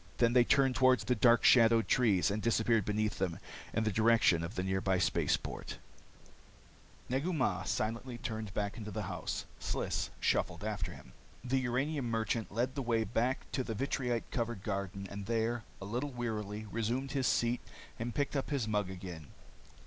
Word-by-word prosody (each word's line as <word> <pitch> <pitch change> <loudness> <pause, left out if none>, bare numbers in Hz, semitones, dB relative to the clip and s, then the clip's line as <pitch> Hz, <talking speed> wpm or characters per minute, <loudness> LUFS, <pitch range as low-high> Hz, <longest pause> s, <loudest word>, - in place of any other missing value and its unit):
Then 120 -1 +3
they 125 -1 +7
turned 135 +1 +3
toward 130 -1 +5
the 125 - +1
dark 120 +1 +5
shadowed 115 -2 +6
trees 100 -7 +3
and 105 +2 -2
disappeared 115 -2 +2
beneath 105 0 -1
them, 90 -3 -1 0.3
in 110 - 0
the 110 - +1
direction 110 -5 +4
of 85 +7 -5
the 90 - -1
nearby 95 0 +1
space 90 - +2
port. - - -7 1.3
Negu 135 +8 0
Mah 100 - 0
silently 115 +5 -2
turned 110 -3 -4
back 100 +1 -2
into 105 -2 -6
the 105 0 -3
house. - - -4
Sliss - - -2
shuffled 90 +1 0
after 100 -5 -3
him. - - -13 0.3
The 130 +1 +1
uranium 130 +1 -1
merchant 115 0 -1
led 120 +5 0
the 140 - -3
way 115 -3 +1
back 120 +4 0
to 130 - -1
the 115 -3 -4
vitrite 125 -1 -1
covered 115 -5 -2
garden 100 -1 -3
and 100 +1 -7
there, 115 0 0
a 100 - -7
little 120 +8 -2
wearily, 110 -4 -4
resumed 120 +5 -1
his 135 -2 +1
seat 120 +1 +1 0.4
and 115 +1 -3
picked 145 0 -1
up 135 - -1
his 135 -7 -1
mug 105 -3 0
again. 90 -5 -8
115 Hz, 175 wpm, -33 LUFS, 100-125 Hz, 1.3 s, they